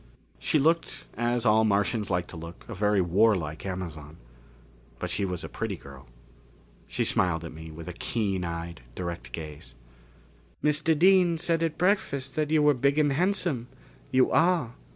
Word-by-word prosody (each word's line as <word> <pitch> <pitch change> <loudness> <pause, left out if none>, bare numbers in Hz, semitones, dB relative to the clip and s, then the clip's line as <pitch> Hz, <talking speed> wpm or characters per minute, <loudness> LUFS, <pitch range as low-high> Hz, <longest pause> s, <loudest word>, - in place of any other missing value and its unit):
She - - +1
looked, 165 +3 +1
as 120 0 0
all 110 0 +5
Martians 105 0 +1
like 90 -2 0
to - - -8
look, 85 +1 -9
a 115 - -6
very 105 0 +2
warlike 90 -3 +1
Amazon. 80 -5 -6 0.8
But - - -4
she 100 - 0
was 90 -3 -4
a - - -4
pretty - - -4
girl. 70 -1 -13 0.8
She - - -1
smiled 85 -2 +1
at 85 - -8
me 80 +1 -9
with 80 +1 -9
a 90 - -5
keen 100 -1 -2
eyed, 85 0 -5
direct 85 -9 -5
gaze. 75 +1 -8 0.9
"Mr. 150 +1 +3
Dean 180 0 +5
said 165 0 +1
at 165 -2 -1
breakfast 140 -8 0
that 155 -2 -1
you 155 -1 +3
were 150 0 +6
big 140 +3 +1
and 150 -2 +3
handsome. 175 -7 +1 0.4
You 130 0 +3
are." 165 -8 +2
110 Hz, 165 wpm, -27 LUFS, -, 0.9 s, were